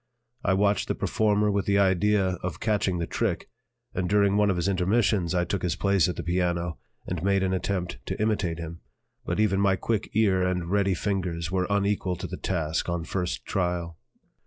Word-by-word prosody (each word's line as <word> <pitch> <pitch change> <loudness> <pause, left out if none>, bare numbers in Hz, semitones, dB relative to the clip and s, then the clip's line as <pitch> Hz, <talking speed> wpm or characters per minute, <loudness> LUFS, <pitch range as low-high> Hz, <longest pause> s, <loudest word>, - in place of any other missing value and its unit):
I 95 - +2
watched 100 0 +2
the - - -1
performer 105 -1 +1
with 100 -1 -1
the 100 0 +3
idea 100 +1 +3
of 90 -2 -4
catching 100 -4 +1
the 85 - -1
trick, - - -2 0.5
and 90 -2 -1
during 100 0 +3
one 105 0 +3
of 95 - +2
his 85 +1 -1
intermissions 95 -1 +1
I 90 0 +2
took 95 +2 -2
his 85 -4 0
place 100 -1 +2
at 90 - -3
the - - -5
piano 85 -1 -1 0.3
and 90 -3 -3
made 100 +1 +2
an 95 0 0
attempt 95 -1 -2
to - - -3
imitate 105 -6 0
him, 85 0 -7 0.5
but - - -2
even 100 -2 +2
my 100 -1 +4
quick 110 +2 -2
ear 100 -4 +3
and 90 -1 -1
ready 100 -2 +2
fingers 85 -3 -2
were 95 -1 0
unequal 100 -2 +1
to 90 - -6
the 90 +1 -5
task 80 -2 -1
on 85 -1 -1
first 90 +1 -3
trial. 90 -3 -2
95 Hz, 195 wpm, -26 LUFS, 90-100 Hz, 0.5 s, my